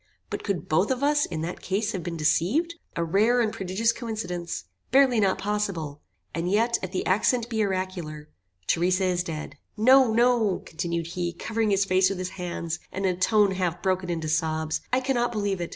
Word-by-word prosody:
But - - -4
could 190 -6 -2
both 160 +6 +2
of 260 +1 -1
us 290 0 +3
in 160 - -4
that 170 +2 -5
case 200 +3 -1
have 185 - -3
been 170 0 -5
deceived? 210 - +1 0.2
A 170 - 0
rare 210 +9 +3
and 220 -3 +1
prodigious 195 +5 0
coincidence! 180 - -4 0.3
Barely 260 -3 +5
not 195 -3 +2
impossible. 190 -7 -2 0.3
And 170 +2 -2
yet, 230 +4 +2
if 185 - -5
the 185 - -2
accent 230 +5 +2
be 220 -2 +1
oracular 185 -6 -3 0.4
Theresa 180 - +2
is 180 -1 +1
dead. 155 -4 -6 0.2
No, 255 +2 +6
no," 230 -3 +2
continued 170 0 -3
he, 175 0 -3
covering 220 +5 -1
his 195 -1 +3
face 185 0 +3
with 195 - -3
his 185 0 -3
hands, 175 -2 -4
and 195 +1 -3
in 185 -1 +2
a - - -16
tone 205 +1 +4
half 180 -3 -2
broken 185 -1 0
into 165 -2 -2
sobs, 160 0 0
"I 255 - +2
cannot 250 -2 0
believe 205 -4 -1
it. 170 - -3
190 Hz, 195 wpm, -26 LUFS, 170-220 Hz, 0.4 s, No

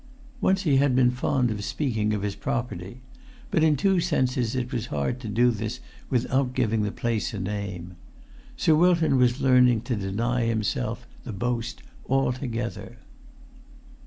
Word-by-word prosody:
Once 190 +1 +2
he 145 -6 +3
had 135 -2 +3
been 125 -1 +4
fond 125 0 0
of 105 -1 -4
speaking 110 -5 -1
of 105 -2 -1
his 100 -1 -1
property; 100 +1 -4 0.5
but 165 -6 +2
in 155 -2 +4
two 190 +6 +2
senses 130 -8 0
it 125 0 -2
was 120 -1 -2
hard 75 - -2
to 120 - -7
do 120 +4 +3
this 110 +1 -4 0.3
without 130 0 0
giving 115 -4 +1
the 105 -1 -1
place 115 -3 -2
a - - -4
name. 95 -3 -5 0.6
Sir 160 - +3
Wilton 165 -3 +4
was 125 +2 +2
learning 125 -3 +5
to 120 0 -2
deny 115 +5 -1
himself 115 +1 -1 0.2
the 125 - -6
boast 120 +3 -3 0.3
altogether. 120 -5 -2
120 Hz, 155 wpm, -26 LUFS, 110-130 Hz, 0.6 s, learning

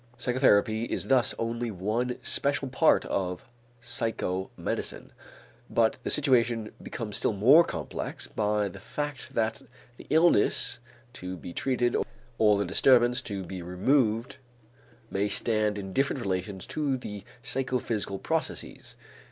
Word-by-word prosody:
Psychotherapy 115 -3 +3
is - - -3
thus 125 -4 +4
only 115 +1 -2
one 110 +6 -2
special 140 -1 0
part 125 - +3
of 90 -2 -2 0.4
psychomedicine. 115 -6 -3 0.6
But 115 -1 +2
the - - -3
situation 120 -6 +2
becomes 110 -4 -4
still - - +1
more 130 - +7
complex 80 - -4
by 105 -1 0
the 95 - -9
fact 145 -4 -5
that 110 -1 0 0.4
the - - -13
illness 160 -8 +3 0.3
to 90 -6 -6
be 85 +1 -8
treated 125 0 0 0.4
or 105 -2 +5
the 100 - 0
disturbance 120 +5 +4
to 100 -6 -4
be 90 +1 -7
removed 115 +7 +1 0.7
may 100 +1 0
stand 105 -1 +1
in 95 -2 -6
different 135 0 0
relations 95 0 -3
to 145 -4 -1
the 105 -5 -7 0.2
psychophysical 125 -7 -1
processes. - - -3
115 Hz, 125 wpm, -28 LUFS, 100-125 Hz, 0.7 s, more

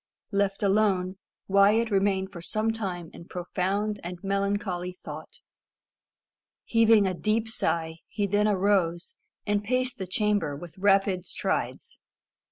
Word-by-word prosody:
Left 200 0 0
alone, 195 -2 +2 0.3
Wyat 205 +4 +4
remained 195 -1 +1
for 170 - -8
some 215 +5 0
time 185 -7 -4
in 170 - -11
profound 195 +4 -2
and 175 +1 -5
melancholy 195 -2 -1
thought. 155 -3 -9 1.3
Heaving 225 -2 +5
a 185 - 0
deep 215 +5 0
sigh, 160 -7 -1
he 205 - -1
then 205 +2 +2
arose, 190 -4 +1 0.3
and 205 0 +1
paced 255 +2 -1
the 190 - -4
chamber 200 -6 0
with 170 +4 -10
rapid 195 -2 +3
strides. - - -3
195 Hz, 125 wpm, -27 LUFS, 180-210 Hz, 1.3 s, Heaving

